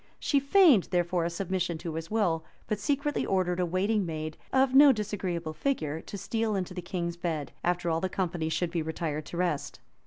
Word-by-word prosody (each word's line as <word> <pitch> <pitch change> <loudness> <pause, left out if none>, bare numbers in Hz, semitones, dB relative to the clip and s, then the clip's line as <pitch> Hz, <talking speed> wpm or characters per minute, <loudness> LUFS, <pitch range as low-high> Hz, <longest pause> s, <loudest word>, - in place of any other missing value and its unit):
She 285 - +2
feigned 280 - +5
therefore 175 -1 0
a - - 0
submission 175 -1 -2
to 165 0 -5
his 165 +1 -5
will; 180 -7 +1 0.2
but 215 -2 -2
secretly 285 +6 0
ordered 185 -2 0
a 180 - +1
waiting 200 +4 +1
maid, 155 -2 -4 0.2
of 265 0 +3
no 280 +1 +9
disagreeable 190 -7 -3
figure, 160 - -2
to 200 - -8
steal 220 +2 -1
into 185 -1 -3
the 180 - -5
king's 170 -1 -3
bed, 160 -4 -3
after 175 0 0
all 165 0 +1
the 190 - -1
company 175 -4 -2
should 170 +1 -1
be 170 -2 -1
retired 155 -1 -3
to 170 - -6
rest. 150 -6 -1
180 Hz, 195 wpm, -29 LUFS, 165-210 Hz, 0.2 s, no